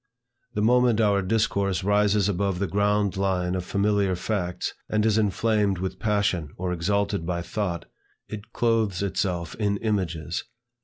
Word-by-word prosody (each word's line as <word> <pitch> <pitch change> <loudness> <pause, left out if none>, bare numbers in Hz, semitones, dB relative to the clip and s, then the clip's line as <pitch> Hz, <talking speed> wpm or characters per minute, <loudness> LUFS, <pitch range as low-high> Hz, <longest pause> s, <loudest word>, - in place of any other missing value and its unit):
The 105 - +1
moment 120 0 +4
our 100 -3 +3
discourse 100 -2 0
rises 105 0 +3
above 100 -1 0
the 100 - 0
ground 100 0 +1
line 90 -2 0
of 90 -1 -2
familiar 100 0 +1
facts, 90 -1 -2 0.2
and 105 0 +1
is 110 -1 +3
inflamed 105 -1 +1
with 95 +1 -4
passion 100 -7 0
or 90 0 -2
exalted 100 +2 0
by 85 0 -2
thought, 85 -3 -3 0.4
it 105 +1 -8
clothes 110 -6 +1
itself 90 -3 -2
in 100 -2 0
images. 90 -7 -2
100 Hz, 145 wpm, -25 LUFS, 90-105 Hz, 0.4 s, moment